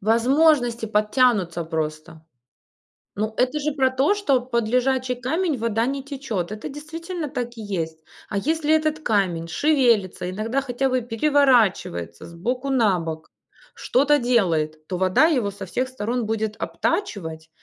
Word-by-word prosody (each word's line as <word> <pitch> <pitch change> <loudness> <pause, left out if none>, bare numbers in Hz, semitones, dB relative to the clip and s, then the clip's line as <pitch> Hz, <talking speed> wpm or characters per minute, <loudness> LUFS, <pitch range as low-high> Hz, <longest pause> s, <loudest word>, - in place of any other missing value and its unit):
Возможности 240 +2 +3
подтянутся 210 -5 +2
просто. 155 0 -5 0.9
Ну, 215 +2 -2
это 255 +4 +1
же 300 +1 -1
про 265 -2 +2
то, 270 +9 +2
что 285 -11 +1
под 235 -3 -1
лежачий 255 +1 +1
камень 295 +6 -1
вода 225 0 0
не 275 +2 -2
течет, 260 - -4
это 215 +1 -6
действительно 320 +3 -6
так 240 -2 -4
и - - -6
есть. 165 -6 -4 0.3
А 205 - -2
если 315 +5 +1
этот 310 0 +1
камень 185 - 0
шевелится, 230 - +2
иногда 225 +7 -1
хотя 265 0 -1
бы 255 0 +1
переворачивается 230 - +1
с 170 - -12
боку 250 +10 -3
на 220 -8 +3
бок, 160 -1 -6 0.5
что-то 290 +3 +2
делает, 165 - 0
то 180 - -3
вода 185 - +4
его 250 -11 +1
со 200 0 -8
всех 255 +8 -1
сторон 245 -1 -2
будет 220 0 -2
обтачивать. 160 - -3
235 Hz, 145 wpm, -23 LUFS, 195-275 Hz, 0.9 s, вода